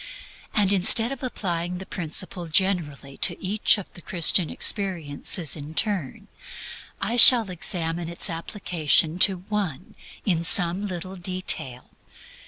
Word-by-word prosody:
And 200 -2 +2
instead 225 +5 +1
of 275 - -7
applying 180 -8 -4
the 190 - -9
principle 175 0 -4
generally 155 -6 -2
to - - 0
each 205 +3 +1
of 200 - -10
the 175 - -13
Christian 170 0 +1
experiences 170 -4 0
in 150 +1 -10
turn, 195 - -1 0.7
I 235 +4 -3
shall 230 -4 +9
examine 170 -1 -4
its 170 - +1
application 165 -2 0
to 185 -2 +3
one 195 -7 -5 0.3
in 170 -5 0
some 180 +3 +2
little 185 +1 -7
detail. 175 -9 -3
180 Hz, 125 wpm, -23 LUFS, 165-195 Hz, 0.7 s, shall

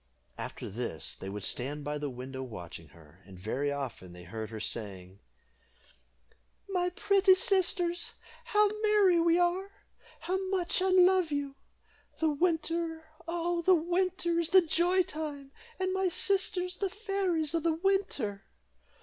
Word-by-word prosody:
After - - -6
this 105 -6 -4
they 95 - -7
would 100 0 -5
stand 145 +8 -1
by 150 +1 -3
the 145 -1 -3
window 130 +1 -7
watching 85 -9 -8
her; 80 +3 -19
and 95 -2 -13
very 130 +10 -2
often 130 -10 -5
they 90 0 -11
heard 110 +4 -6
her 110 -1 -7
saying 100 -4 -5 1.5
"My 360 -2 0
pretty 385 +1 +4
sisters, 360 -2 +2 0.3
how 420 0 +4
merry 415 -5 +4
we 335 0 +4
are 355 +2 +1 0.5
how 370 +3 -1
much 370 -2 0
I 380 - +2
love 370 -2 +5
you! 285 -1 -2 0.7
The 320 -1 +2
winter, 330 0 -1 0.2
oh! 340 0 -1
the 370 +2 +5
winter, 350 +1 0
is 335 -1 0
the 375 +1 +7
joy 350 +3 +3
time, 295 -4 -6 0.3
and 375 0 0
my 380 -1 +1
sisters 365 0 +1
the 395 - -1
fairies 380 -7 -1
of 330 - +1
the 330 0 +2
winter." 325 - -1
335 Hz, 145 wpm, -30 LUFS, -, 1.5 s, the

